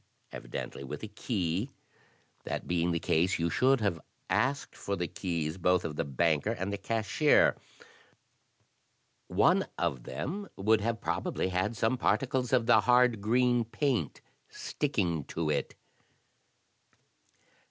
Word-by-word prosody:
Evidently - - -6
with 75 +7 -7
a - - -3
key. 105 -1 -2 0.7
That - - -4
being 85 0 +1
the 85 - +1
case, 85 +3 +1
you 85 0 -1
should 130 - +3
have 90 -6 0 0.3
asked 140 +2 0
for 100 - -3
the 90 -2 -2
keys 85 -2 -3
both 90 +1 +2
of 75 - -4
the - - -1
banker 75 +6 +1
and 100 -3 -2
the 100 - -3
cashier. 115 +8 +3 1.7
One - - +3
of 65 - -1
them 180 - -5
would 105 +2 +3
have 115 0 -2
probably - - -1
had 100 +5 -1
some 120 +3 +1
particles 130 -2 0
of 125 -3 +3
the 110 -1 +5
hard 125 -1 +4
green 120 +2 +2
paint 130 +2 -1 0.3
sticking 90 - -2
to 80 -2 -2
it." - - -2
100 Hz, 130 wpm, -30 LUFS, 85-120 Hz, 1.7 s, the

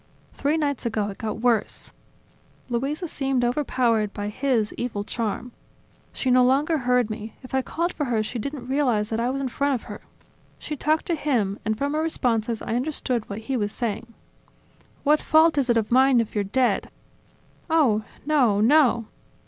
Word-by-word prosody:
Three 290 +3 0
nights 285 -3 -1
ago, 215 -2 -1
it 195 - -12
got 220 -1 -4
worse... 240 -2 0 0.8
Luisa 275 +8 -2
seemed 270 -4 0
overpowered 240 -5 +1
by 205 0 -4
his 230 -2 0
evil 225 -4 -3
charm... 230 +3 -3 0.6
She 260 - -1
no 250 0 +6
longer 290 +5 +2
heard 250 -3 +1
me; 215 0 -7
if 255 - -12
I 265 - +2
called 340 +6 -2
for 295 - -2
her, 230 -4 0
she 235 +3 -5
didn't 275 +1 -5
realize 250 -6 +1
that 225 - 0
I 240 +2 +1
was 270 +1 -2
in 270 - -1
front 280 +2 0
of 240 - -5
her... - - -9 0.6
She 300 - -5
talked 310 +2 +1
to 345 - 0
him 240 -10 0
and, 220 0 -1
from 280 +4 -1
her 310 - 0
responses, 235 -8 -1
I - - -3
understood 250 -3 -2
what 205 +2 -5
he 260 +4 -3
was 205 -4 -1
saying. 230 0 -4 0.9
"What 300 +1 +4
fault 315 0 +4
is 275 -3 +1
it 235 - +4
of 220 0 -1
mine 260 0 +5
if 230 - -2
you're 205 - 0
dead? 250 +5 +1 0.8
Oh! 265 -10 +3 0.2
No, 260 -9 +3
no! 240 -1 +4
250 Hz, 180 wpm, -24 LUFS, 220-280 Hz, 0.9 s, no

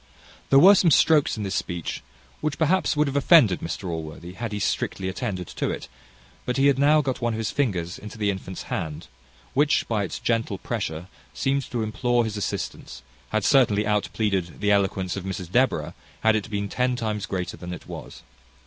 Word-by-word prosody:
There 135 - +6
were 190 +8 +9
some 185 -3 +4
strokes 150 -3 +4
in 105 - -3
this 95 - -3
speech 85 -2 -3 0.4
which 155 -2 -2
perhaps 165 0 +2
would 150 - +4
have 140 -1 -3
offended 140 - +5
Mr 90 +3 -5
Allworthy, 80 +1 -6
had 115 +3 -5
he 105 - -3
strictly 95 -1 -1
attended 95 -2 -3
to - - -2
it; - - -5 0.6
but 125 - -2
he 135 - +3
had 140 -2 +4
now 150 +2 +5
got 130 -3 -3
one 120 -1 0
of - - -3
his 110 -1 -2
fingers 90 -11 -1
into 105 +1 -9
the 105 -2 +1
infant's 95 -1 -7
hand, 80 -2 -4 0.5
which, 145 +2 +2
by 110 -3 0
its 95 - -4
gentle 115 -4 -1
pressure, 90 -7 -4 0.3
seeming 135 - +1
to 120 -2 -2
implore 120 +3 +1
his 110 -1 -4
assistance, 65 -10 -5 0.3
had 110 -2 0
certainly 110 -6 +4
out 105 -1 +1
pleaded 95 -6 -1
the 105 0 +2
eloquence 95 -2 +1
of 100 - -5
Mrs 95 -2 -5
Deborah, 90 -10 +1 0.3
had 110 0 +4
it 110 +1 -2
been 100 -1 -2
ten 125 +4 0
times 110 -4 -3
greater 90 -2 -3
than 90 0 -8
it 90 - -8
was. - - -9
105 Hz, 195 wpm, -25 LUFS, 95-125 Hz, 0.6 s, were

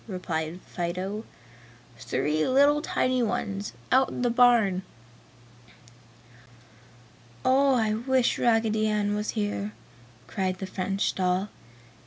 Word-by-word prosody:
replied 170 -4 -4
Fido, 185 +4 -4 0.8
"Three 145 +7 -1
little 285 +3 +4
tiny 255 -4 0
ones, 205 -2 -2 0.2
out 260 0 +4
in - - -4
the 245 - +2
barn!" 230 -6 +4 2.6
"Oh, 270 +1 +4
I 220 -3 +1
wish 250 +2 +1
Raggedy 225 -2 +2
Ann 210 -1 0
was 210 +2 -3
here!" 205 0 -2 0.5
cried 185 +2 -2
the 190 - -5
French 195 +1 -2
doll. 185 +2 0
210 Hz, 105 wpm, -26 LUFS, 185-240 Hz, 2.6 s, little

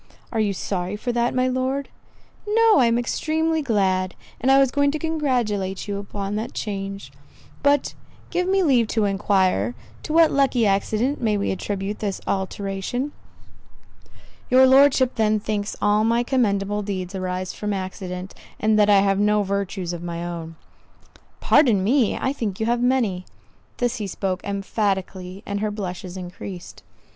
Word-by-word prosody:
"Are 225 - -1
you 210 -2 +2
sorry 185 0 -3
for 245 +4 -3
that, 240 +1 0
my 255 0 +2
Lord?" 260 +2 -1 0.6
"No, 445 -3 +5
I 245 - +5
am 230 0 +2
extremely 315 +6 0
glad; 190 -7 0 0.2
and 260 - +1
I 270 - +7
was 270 -2 +4
going 285 0 +2
to 300 - -1
congratulate 245 - -1
you 200 -1 -3
upon 200 0 -5
the 220 +2 -2
change. 195 - -5 0.5
But 285 -1 +2 0.4
give 360 0 0
me 385 0 +3
leave 250 -8 +3
to 220 -1 +1
enquire, 190 - +1 0.3
to - - -6
what 325 0 +5
lucky 270 -4 +2
accident 215 +7 0
we 215 -3 +1
may 200 - -1
attribute 195 +2 -3
this 200 -3 -2
alteration?" 195 +7 -2 1.4
"Your 260 +1 +7
Lordship 265 -1 +5
then 215 -1 +2
thinks 205 0 -3
all 210 +1 +3
my 230 +2 +2
commendable 205 -5 0
deeds 190 -2 -4
arise 185 -1 -3
from 210 0 -4
accident, 185 -1 -5 0.3
and 215 0 +3
that 210 0 +4
I 200 -1 +6
have 195 0 +2
no 210 0 +3
virtues 195 -2 -3
of 170 - -6
my 170 0 -4
own." 165 -1 -6 0.9
"Pardon 235 -10 +4
me, 240 +2 +2
I 265 - -1
think 215 -9 -4
you 220 - 0
have 240 +1 +1
many." 235 -8 +1 0.5
This 245 0 0
he 210 -3 -3
spoke 190 -1 -3
emphatically; 195 -1 -2
and 200 0 -3
her 215 +1 -1
blushes 185 -2 -6
increased. 180 0 -8
210 Hz, 160 wpm, -23 LUFS, 195-250 Hz, 1.4 s, I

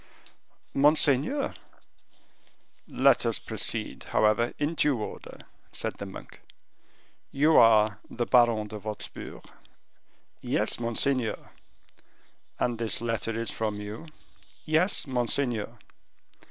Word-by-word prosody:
"Monseigneur 150 - +3 0.7
" - - -36 0.2
"Let 135 -3 +6
us 115 -2 0
proceed, - - -5
however, 110 +2 +1
in 145 +3 -1
due 145 -6 +1
order," 105 - -8 0.3
said - - -4
the - - -5
monk. - - -11 0.9
"You 150 +3 +3
are 110 -2 +5
the 120 - -2
Baron 115 -4 +3
de 105 0 -7
Wostpur?" 105 0 -7 1.0
"Yes, - - -1
monseigneur." 120 +1 -1 1.1
"And 120 -2 -1
this 115 -2 0
letter 115 -1 -2
is 115 - -2
from 105 -2 -3
you?" 105 +9 -8 0.6
"Yes, 160 +5 +3
monseigneur." 120 -3 -1
120 Hz, 100 wpm, -27 LUFS, 110-140 Hz, 1.1 s, Let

